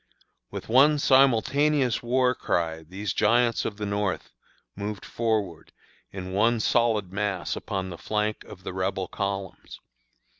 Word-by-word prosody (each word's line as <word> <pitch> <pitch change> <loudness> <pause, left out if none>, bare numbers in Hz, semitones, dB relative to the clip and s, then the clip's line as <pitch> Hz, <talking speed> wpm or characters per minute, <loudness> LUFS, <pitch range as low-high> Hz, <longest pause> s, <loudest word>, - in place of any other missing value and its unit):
With - - -7
one 140 +6 +5
simultaneous 135 0 +3
war 125 +1 +2
cry 80 -8 -1
these 95 +4 -5
giants 115 +2 +2
of 105 - -3
the 105 - -3
North 100 -1 -2 0.4
moved 105 0 -5
forward 105 -8 -2 0.4
in 95 -1 -6
one 115 +4 +3
solid 110 -4 +1
mass 100 -3 -2
upon 95 -1 -4
the 85 - -8
flank 105 0 -2
of 95 - -12
the - - -5
Rebel 95 0 -2
columns. 100 -1 -5
105 Hz, 135 wpm, -26 LUFS, 95-120 Hz, 0.4 s, one